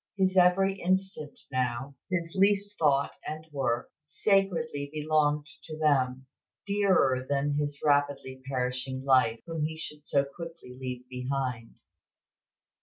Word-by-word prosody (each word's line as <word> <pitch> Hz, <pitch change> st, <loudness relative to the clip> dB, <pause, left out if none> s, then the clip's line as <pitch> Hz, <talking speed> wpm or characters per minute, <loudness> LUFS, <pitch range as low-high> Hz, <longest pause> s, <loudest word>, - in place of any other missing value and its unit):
His 190 Hz, -1 st, +2 dB
every 190 Hz, +2 st, +4 dB
instant 185 Hz, -5 st, -1 dB
now, 130 Hz, +1 st, -1 dB, 0.2 s
his 170 Hz, -3 st, -2 dB
least 200 Hz, +1 st, +2 dB
thought 140 Hz, -3 st, +3 dB
and 155 Hz, +1 st, -6 dB
work, 130 Hz, -4 st, -1 dB
sacredly 160 Hz, -4 st, +1 dB
belonged 150 Hz, -1 st, +1 dB, 0.2 s
to 155 Hz, -1 st, -7 dB
them, 135 Hz, -4 st, +2 dB, 0.4 s
dearer 190 Hz, -11 st, +3 dB
than 145 Hz, +1 st, +1 dB
his 145 Hz, -1 st, -2 dB
rapidly 145 Hz, -2 st, +1 dB
perishing 130 Hz, 0 st, -2 dB
life, 130 Hz, -4 st, +4 dB
whom 165 Hz, -2 st, -3 dB
he 160 Hz, +1 st, -2 dB
should 150 Hz, -2 st, -7 dB
so 140 Hz, 0 st, +2 dB
quickly 165 Hz, -3 st, -9 dB
leave 125 Hz, -1 st, -6 dB
behind." 125 Hz, -2 st, -3 dB
145 Hz, 120 wpm, -29 LUFS, 130-170 Hz, 0.4 s, every